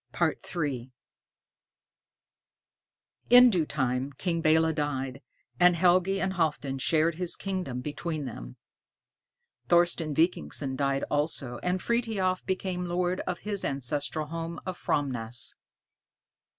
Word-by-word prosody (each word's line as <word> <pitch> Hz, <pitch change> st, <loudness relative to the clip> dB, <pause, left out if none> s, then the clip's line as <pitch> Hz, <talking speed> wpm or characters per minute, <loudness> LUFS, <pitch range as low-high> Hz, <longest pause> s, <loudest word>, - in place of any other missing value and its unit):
III 140 Hz, -7 st, -1 dB, 2.4 s
In 245 Hz, 0 st, +9 dB
due 170 Hz, -6 st, +1 dB
time, 130 Hz, -1 st, -1 dB
King 170 Hz, +3 st, -2 dB
Belé 160 Hz, +1 st, +4 dB
died, 135 Hz, -3 st, -3 dB, 0.4 s
and 180 Hz, -1 st, +6 dB
Helgi 185 Hz, +2 st, +3 dB
and 190 Hz, 0 st, 0 dB
Halfdan 145 Hz, -6 st, -1 dB
shared 160 Hz, +4 st, +2 dB
his 175 Hz, +1 st, -1 dB
kingdom 185 Hz, -10 st, -3 dB
between 150 Hz, +2 st, -4 dB
them. -, -, -8 dB, 1.1 s
Thorsten 170 Hz, -3 st, +3 dB
Vikingsson 140 Hz, -, 0 dB
died 140 Hz, 0 st, 0 dB
also, 145 Hz, -4 st, -1 dB
and 180 Hz, 0 st, -1 dB
Frithiof 220 Hz, -6 st, 0 dB
became 185 Hz, -1 st, -2 dB
lord 180 Hz, +1 st, 0 dB
of 180 Hz, -, -3 dB
his 205 Hz, -2 st, -2 dB
ancestral 145 Hz, +3 st, -1 dB
home 165 Hz, +2 st, -5 dB
of 185 Hz, -1 st, -3 dB
Framnäs. 125 Hz, -7 st, -2 dB
160 Hz, 110 wpm, -28 LUFS, 135-180 Hz, 2.4 s, In